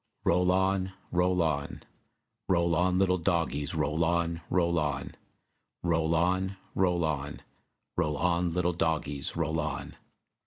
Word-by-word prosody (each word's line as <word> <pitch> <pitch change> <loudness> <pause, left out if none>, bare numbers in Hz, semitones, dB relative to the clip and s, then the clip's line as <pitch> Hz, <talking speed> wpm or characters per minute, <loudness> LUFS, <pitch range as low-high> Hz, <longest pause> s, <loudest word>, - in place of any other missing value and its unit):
Roll 90 +1 +3
on, 95 0 +1 0.2
roll 90 0 +2
on; 70 -3 -2 0.7
Roll 85 -2 +3
on, 90 +2 +2
little 90 -1 +3
dogies, 80 -4 0
roll 75 +1 +1
on, 85 0 0
roll 85 -2 +2
on, 75 -3 -2 0.7
Roll 85 -1 +2
on, 95 +3 +1 0.2
roll 90 -3 +2
on; 75 -2 -3 0.5
Roll 75 -4 0
on, 85 +2 +1
little 90 +1 +1
dogies, 80 -4 -1
roll 80 -1 0
on. 75 -3 -4
85 Hz, 125 wpm, -29 LUFS, 80-90 Hz, 0.7 s, Roll